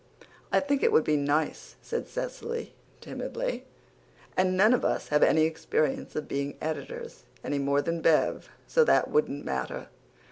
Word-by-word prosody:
"I - - +5
think 285 -1 0
it - - +4
would 155 - +5
be 155 - +2
nice," 145 +2 -1
said 470 - -3
Cecily 475 -2 -5 0.3
timidly, - - -4 0.7
"and 185 0 +2
none 215 +5 +6
of 250 - +1
us - - 0
have 150 0 +3
any 155 - +5
experience 155 -2 -1
of 155 - -3
being 140 +1 -3
editors, 470 - -5 0.2
any 145 - -1
more 140 +1 +1
than 165 +2 -2
Bev, 160 -1 +2 0.2
so 485 - +4
that - - +3
wouldn't 455 0 0
matter." - - -3
165 Hz, 155 wpm, -28 LUFS, -, 0.7 s, none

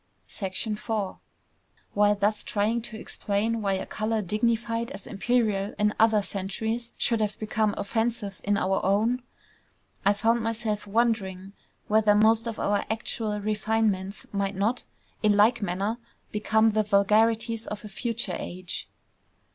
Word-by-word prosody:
IV 210 +3 -4 1.0
While 205 0 +4
thus 205 +1 0
trying 220 +3 0
to 220 -1 -8
explain 220 +2 -1
why 200 -2 +1
a 190 - -2
color 215 0 -1
dignified 230 +3 0
as 240 -8 -8
imperial 215 -2 0
in 210 0 +2
other 220 -2 +5
centuries 220 +5 -3
should 230 -2 +1
have 210 -1 -1
become 215 -1 0
offensive 225 -1 -2
in 205 0 +2
our 190 0 +1
own, 220 +6 +2 0.8
I 200 - +5
found 230 +3 +2
myself 220 -2 -2
wondering 200 -4 0 0.3
whether 215 -1 +4
most 220 +2 +4
of 225 - -4
our 205 0 +1
actual 220 -1 -1
refinements 210 -2 0
might 200 -1 -1
not 215 +6 0 0.4
in 210 -1 +4
like 225 +3 +5
manner 200 +4 -1 0.3
become 220 +1 +3
the 215 0 +2
vulgarities 220 +2 +2
of 210 +1 -6
a - - -5
future 230 -2 -2
age. 180 0 -6
215 Hz, 135 wpm, -27 LUFS, 200-225 Hz, 1.0 s, other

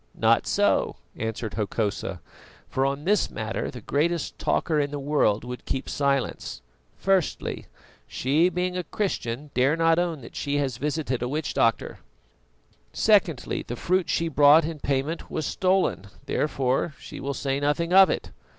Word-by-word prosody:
"Not - - +3
so," - - +2 0.2
answered 110 -1 -4
Hokosa, 105 -4 -2 0.5
"for 135 +1 0
on 140 +1 -3
this 205 +4 +2
matter 110 0 -3
the 125 - -9
greatest 160 +7 -1
talker 155 -2 +1
in 145 -1 0
the 145 - -4
world 140 -7 +1
would 125 0 -7
keep 135 - -2
silence. 140 -2 -1 0.3
Firstly, 190 -4 0 0.4
she, 150 +7 +2
being 180 +1 -2
a 180 - -2
Christian, 145 - -3
dare 135 +5 +3
not 165 0 +3
own 170 -5 -1
that 115 - -12
she 145 0 -1
has 135 -5 -1
visited 145 -3 -2
a 125 - -1
witch 150 +3 -2
doctor. - - +1 0.9
Secondly, 200 - +2
the 120 - -6
fruit 185 +7 0
she 165 - +1
brought 150 +1 +6
in 160 -1 -5
payment 140 +4 -2
was 155 - -3
stolen, 185 - +1 0.2
therefore 135 +1 0
she - - -9
will 140 0 -3
say 135 0 -1
nothing 155 +4 0
of 190 0 +8
it. - - -3
145 Hz, 155 wpm, -25 LUFS, 130-165 Hz, 0.9 s, of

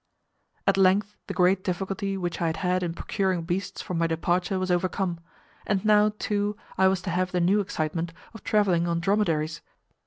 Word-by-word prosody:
At - - +3
length 195 +2 +3
the 195 - -3
great 185 +1 +3
difficulty 195 +1 -2
which 175 -2 -3
I 170 - +2
had 160 - -1
had 180 0 +2
in 170 -2 -2
procuring 190 -3 -1
beasts 180 +3 -3
for - - -5
my 165 -1 +1
departure 175 +4 0
was 185 0 -1
overcome, 180 0 0 0.4
and 200 -1 -1
now, 210 0 +5
too, 205 0 -1 0.2
I 190 - +4
was 190 -1 +1
to 185 - -3
have 180 +1 0
the 180 - 0
new 185 +4 +3
excitement 165 -3 -2 0.2
of 225 - -11
travelling 185 -5 +2
on 170 0 0
dromedaries. 165 -5 0
185 Hz, 185 wpm, -26 LUFS, 175-195 Hz, 0.4 s, now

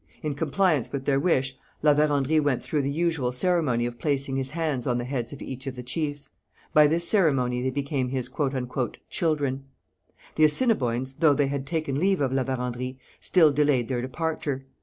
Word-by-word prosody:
In 150 -1 -1
compliance 155 -1 +1
with 135 -1 -4
their 135 -1 +2
wish, 140 -4 +1 0.3
La 150 -1 +6
Vérendrye 150 0 +2
went 145 -4 0
through 150 - -1
the 140 - -1
usual 160 -4 0
ceremony 130 -4 +1
of 120 -1 -5
placing 140 -2 -1
his 135 -1 -2
hands 150 -5 -2
on 120 -1 +1
the 120 - -2
heads 125 -2 -3
of 140 - -8
each 130 +1 -7
of 135 - -4
the 125 - -7
chiefs. 145 +1 -3 0.4
By 150 -1 +7
this 170 +3 +2
ceremony 135 - +2
they 130 - 0
became 140 -1 -2
his 130 -1 -1
'children.' 135 +1 -2 0.7
The 155 - +3
Assiniboines, 135 - +2
though 155 -4 +5
they 140 -1 +1
had 140 -1 -3
taken 155 -3 -1
leave 190 +2 +2
of 135 -2 0
La 135 -1 +1
Vérendrye, 125 0 -3 0.2
still 160 -5 +4
delayed 140 -4 +2
their 125 -2 -1
departure. 140 0 -3
140 Hz, 180 wpm, -26 LUFS, 130-155 Hz, 0.7 s, By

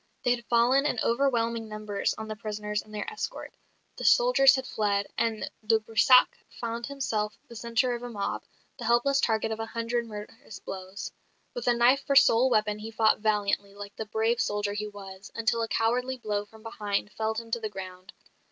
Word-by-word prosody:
They 245 - +3
had 235 -1 -12
fallen 250 +4 +4
in 245 - -1
overwhelming 235 -3 +1
numbers 215 -1 -2
on 220 - -6
the 215 - -5
prisoners 210 -1 -3
and 215 - -18
their 210 -1 -4
escort; - - -5 0.4
the - - -6
soldiers 485 - +6
had 265 -1 -3
fled; 205 -3 0
and 225 -2 -1 0.2
de 220 +1 +4
Brissac 225 +4 +4
found 235 0 -5
himself 220 -7 -2
the 235 - -12
centre 235 +2 0
of 240 - -4
a 245 - -6
mob, 205 -4 -3 0.4
the - - -5
helpless 270 +4 +3
target 220 -1 +1
of 220 - -3
a 225 - -3
hundred 230 +1 -2
murderous 210 0 -9
blows. 190 +2 -7 0.4
With 245 0 -5
a 240 - +4
knife 250 +4 +4
for 280 - 0
sole 260 -2 +6
weapon 215 -3 +1
he 220 +1 -6
fought 220 -1 +3
valiantly, 205 -2 0
like 205 0 -9
the 220 - -5
brave 225 +3 +1
soldier 205 -3 -1
he 210 +1 -3
was, 195 -1 -10
until 230 0 +1
a 225 - 0
cowardly 250 +4 0
blow 210 -3 -2
from 220 +1 -17
behind 210 -2 -3
felled 220 +1 -2
him 230 0 -6
to 235 - 0
the 220 -1 -4
ground. 185 -1 -9
225 Hz, 195 wpm, -28 LUFS, 210-240 Hz, 0.4 s, soldiers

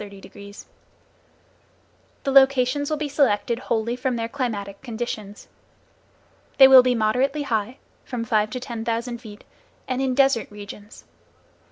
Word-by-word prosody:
The 200 0 -12 1.7
locations 270 +1 +3
will 310 - -1
be 300 0 -3
selected 245 -5 +1
wholly 235 -1 -2
from 255 0 -2
their 230 -1 -3
climatic 210 -7 -4
conditions. 220 -4 -6 1.1
They 265 - +9
will 265 -1 +9
be 250 0 +1
moderately 250 +7 0
high, 230 -1 -2 0.3
from 245 -3 -5
five 215 -2 +1
to 255 - -5
ten 235 -3 -6
thousand 235 +1 -3
feet, 215 -3 -12 0.4
and 255 0 -2
in 260 -1 0
desert 270 -3 +2
regions. 205 0 -11
240 Hz, 130 wpm, -23 LUFS, 215-265 Hz, 1.7 s, They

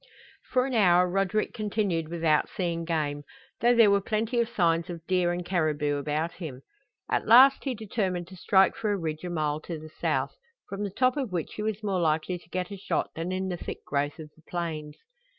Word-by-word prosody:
For 255 0 +2
an 265 - -3
hour 180 -5 +5
Roderick 195 +3 0
continued 200 -7 -1
without 165 -3 +1
seeing 170 -2 -2
game, 150 -3 -1 0.4
though 240 +1 +4
there 225 -3 +6
were 200 0 +3
plenty 225 +4 -1
of 235 -1 +1
signs 170 -6 +1
of 170 -2 -7
deer 180 -1 +2
and 175 0 -3
caribou 155 -5 0
about 150 +3 -1
him. 150 -8 -8 0.5
At - - 0
last 260 +6 +7
he 265 -2 -1
determined 195 -5 -2
to 190 - -11
strike 190 +1 +3
for 215 -2 -1
a 205 - +1
ridge 160 -3 -4
a 180 - -4
mile 155 -3 -1
to 165 +1 -6
the 155 0 -10
south, - - 0 0.3
from 200 +1 -4
the 205 - -2
top 255 +7 +1
of 260 -8 -2
which 170 -4 -3
he - - -5
was 215 0 -2
more 195 -3 0
likely 160 +3 0
to 170 - -22
get 180 +2 -3
a 200 - -6
shot 190 - -2
than 165 +3 -4
in 190 0 -2
the 180 - -3
thick - - -7
growth 145 +2 -1
of 155 -2 -10
the 160 - -22
plains. 155 -4 -4
180 Hz, 215 wpm, -27 LUFS, 160-205 Hz, 0.5 s, last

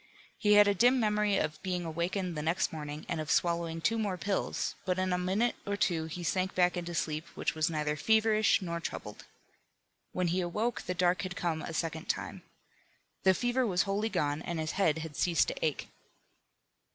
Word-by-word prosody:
He 210 -1 +4
had 205 0 +7
a 205 - +4
dim 245 +6 +4
memory 210 -2 +2
of 155 0 -2
being 180 -2 -2
awakened 175 +2 -2
the 150 - -2
next 165 +4 0
morning 150 -1 -6
and 165 -2 -2
of 155 - -6
swallowing 170 -1 +1
two 225 +6 +1
more 200 -4 -1
pills, 195 +2 -1
but 185 -2 0
in 185 -1 0
a - - +2
minute 195 +7 +1
or 200 0 -2
two 165 -5 +1
he 170 +2 -6
sank 185 +2 -1
back 180 -1 +3
into 175 -1 -4
a - - -4
sleep 155 0 -2
which - - -1
was 155 0 +1
neither 150 -2 -1
feverish 220 +3 +3
nor 170 -1 -3
troubled. 105 -9 -6 0.9
When 180 -1 0
he 180 +2 +1
awoke 215 +7 -1
the 180 - -4
dark 180 -1 +2
had 180 -1 -5
come 165 -3 -1
a - - -5
second 160 0 -3
time. - - -3 0.8
The 190 0 +6
fever 245 +4 +1
was 185 -6 +2
wholly 205 +2 -1
gone, 145 -5 -1
and 170 -1 -4
his 155 0 -2
head 165 -6 +2
had 155 -2 -9
ceased 175 - +2
to - - -5
ache. - - -1
180 Hz, 200 wpm, -31 LUFS, 165-205 Hz, 0.9 s, had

